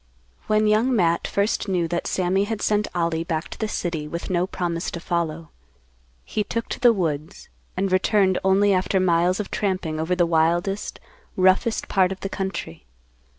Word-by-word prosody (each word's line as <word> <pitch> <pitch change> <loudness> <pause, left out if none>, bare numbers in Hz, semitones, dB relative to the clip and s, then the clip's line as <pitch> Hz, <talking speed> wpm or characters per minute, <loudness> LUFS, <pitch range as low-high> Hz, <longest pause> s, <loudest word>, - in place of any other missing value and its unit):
When 215 0 +3
Young 220 +4 +3
Matt 170 -5 +2
first 200 +1 0
knew 180 -3 0
that 170 0 -2
Sammy 190 +2 +1
had 220 0 -4
sent 210 0 +1
Ollie 165 -1 0
back 165 -1 -3
to - - -10
the 220 - -1
city 165 -7 -3
with 170 +4 -5
no 180 0 +1
promise 175 -3 -3
to 170 - -6
follow, 165 -2 -3 0.7
he 210 - -1
took 230 +2 -3
to - - -4
the 245 -1 +6
woods, 165 -4 -3 0.3
and 195 0 0
returned 190 0 +3
only 195 +1 +4
after 190 +1 +1
miles 180 +1 +2
of 210 - -4
tramping 185 -6 -2
over 165 +3 0
the 175 -1 +3
wildest, 170 +4 0 0.4
roughest 190 +5 +2
part 190 -2 +2
of 190 - -6
the 195 - -3
country. 190 - -5
185 Hz, 175 wpm, -23 LUFS, 170-200 Hz, 0.7 s, the